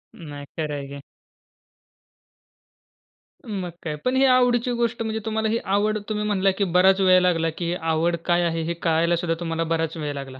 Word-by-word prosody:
नाही 145 -4 -9
खरं 155 -2 -2
आहे 140 -1 -6
की. 140 0 -8 2.5
मग 195 -5 -4
काय. 155 -2 -3
पण 255 +1 +1
ही 270 - +4
आवडीची 250 -1 +3
गोष्ट, 235 -1 -1
म्हणजे 220 0 -2
तुम्हाला 220 0 -1
ही 230 - +1 0.2
आवड 215 +1 +1
तुम्ही 210 0 -1
म्हणला, 195 -2 +2
की 200 +2 -2
बराच 190 +2 +4
वेळ 185 -1 +6
लागला, 165 -2 +2
की 175 - -3
ही 170 - -1 0.2
आवड 170 +2 +1
काय 175 0 +2
आहे? 165 -1 -1
हे 170 +1 -2
कळायलासुद्धा 170 0 0
तुम्हाला 165 -1 -2
बराच 165 0 -1
वेळ 150 -2 -3
लागला. 135 -1 -8
175 Hz, 180 wpm, -23 LUFS, 165-215 Hz, 2.5 s, वेळ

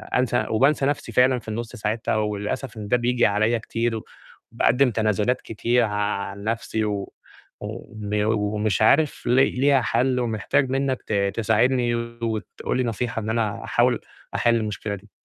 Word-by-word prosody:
أنسى 125 -1 +1
وبانسى 135 +5 +3
نَفْسي 140 -4 -1
فعلًا 125 +2 +4
في 115 - -19
النُص 115 +1 -5
ساعتها 110 +2 -1
وللأسف 105 +3 -2
إن 105 -1 -6
ده 125 - +3
بييجي 120 0 +2
عليَّ 110 +3 +2
كتير 115 +1 -2
و 110 - -8 0.5
وباقدّم 125 0 +3
تنازلات 110 +2 +1
كتير 120 +2 +1
عن 105 -2 -2
نَفْسي 110 0 -1
و 100 -2 -3 0.5
وبيو 105 0 -3
ومش 105 -1 0
عارف 140 +7 +3
لي 130 +2 +4
ليها 135 +1 +3
حَل 125 +1 +1
ومحتاج 125 +4 0
منّك 135 -1 0
ت - - -2 0.2
تساعدني 120 +2 +2
وتقول 115 -1 -3
لي 130 - +1
نصيحة 115 0 -2
إن 110 - -4
أنا 110 -2 -1
أحاول - - +2 0.3
أحِل 120 0 +3
المشكلة 105 -2 -2
دي. 100 +1 -15
115 Hz, 155 wpm, -24 LUFS, 105-125 Hz, 0.5 s, فعلًا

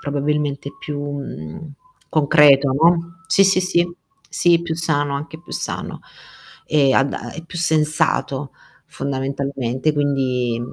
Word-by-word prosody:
probabilmente 145 -1 -2
più, 145 -1 -5
mhmm, 140 - -7 0.4
concreto, 145 -2 +5
no. 170 +4 +2
Sì 185 +1 +4
sì 190 -1 +4
sì, 175 -2 0 0.3
sì, 170 -1 +3
più 170 -1 -3
sano, 145 -3 0
anche 150 +3 -6
più 175 - -13
sano - - -4 0.7
e 140 -3 +3
ad 135 +1 +2
a - - -6
e 165 - -7
più 170 +1 -8
sensato 150 -3 0 0.3
fondamentalmente 135 0 -2
quindi 130 -5 0
145 Hz, 125 wpm, -20 LUFS, 140-160 Hz, 0.7 s, concreto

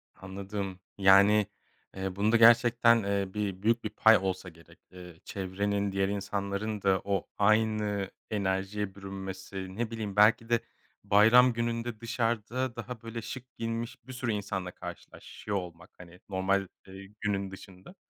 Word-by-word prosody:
Anladım, 95 0 -6 0.2
yani, 100 +1 +6 0.5
eee, 95 -1 -4
bunda 110 +3 +3
gerçekten, 115 0 +6
eee, 100 -1 -1
bir 100 -3 -3
büyük 115 +2 +2
bir 110 - -2
pay 110 +1 +5
olsa 95 -1 -3
gerek. 85 0 -19
Eee, 90 -2 -12
çevrenin 100 +1 -2
diğer 95 0 +1
insanların 100 +1 -3
da 95 -1 +2
o 100 -3 -1
aynı 105 -2 +1 0.2
enerjiye 95 0 -2
bürünmesi, 95 -1 -7
ne 115 0 -2
bileyim, 105 -3 -5
belki 115 +2 +4
de 115 -1 +3 0.4
bayram 120 +5 +6
gününde 115 -1 -3
dışarıda 115 +2 -2
daha, 115 0 -7
böyle 115 0 -6
şık 130 +2 -9
giyinmiş 115 +1 -5
bir 130 - -8
sürü 125 -2 -2
insanla 95 -3 -3
karşılaşıyor 100 +2 -7
olmak, 90 -1 -8
hani, 90 0 -14
normal, 95 0 0 0.2
ııı, 95 0 -11 0.2
günün 100 -2 -1
dışında 95 - -13
100 Hz, 140 wpm, -29 LUFS, 95-115 Hz, 0.5 s, yani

